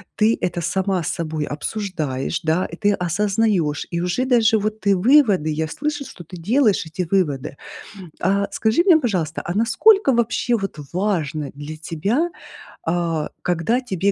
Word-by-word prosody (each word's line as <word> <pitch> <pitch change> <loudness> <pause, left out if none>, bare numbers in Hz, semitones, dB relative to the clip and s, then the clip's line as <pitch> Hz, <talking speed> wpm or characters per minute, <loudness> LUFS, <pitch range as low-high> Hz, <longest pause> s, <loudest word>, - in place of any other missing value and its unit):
Ты 220 +1 +3
это 175 -1 -1
сама 190 +1 0
с 160 - -4
собой 155 -2 -2
обсуждаешь, 150 -5 -3
да, 165 +2 +1
и 170 - -7
ты 205 +2 +2
осознаешь, 190 -3 0
и 170 -1 -2
уже 180 +8 0
даже 225 -4 +4
вот 215 +1 -3
ты 200 -1 +3
выводы 205 - +4
я 155 +1 -1
слышу, 290 - -3
что 175 - -11
ты 180 - -10
делаешь 215 +1 +2
эти 180 +4 -4
выводы. 145 -8 0 0.7
А, 200 +2 +1
скажи 220 +9 +2
мне, 350 -5 +6
пожалуйста, 180 - -1
а 175 - -3
насколько 280 - +4
вообще 235 +1 +1
вот 195 -6 -5
важно 165 -7 -1
для 145 +2 -7
тебя, 200 - -1 0.6
а, 165 -2 -1
когда 180 +9 0
тебе 200 -4 0
190 Hz, 155 wpm, -21 LUFS, 160-220 Hz, 0.7 s, мне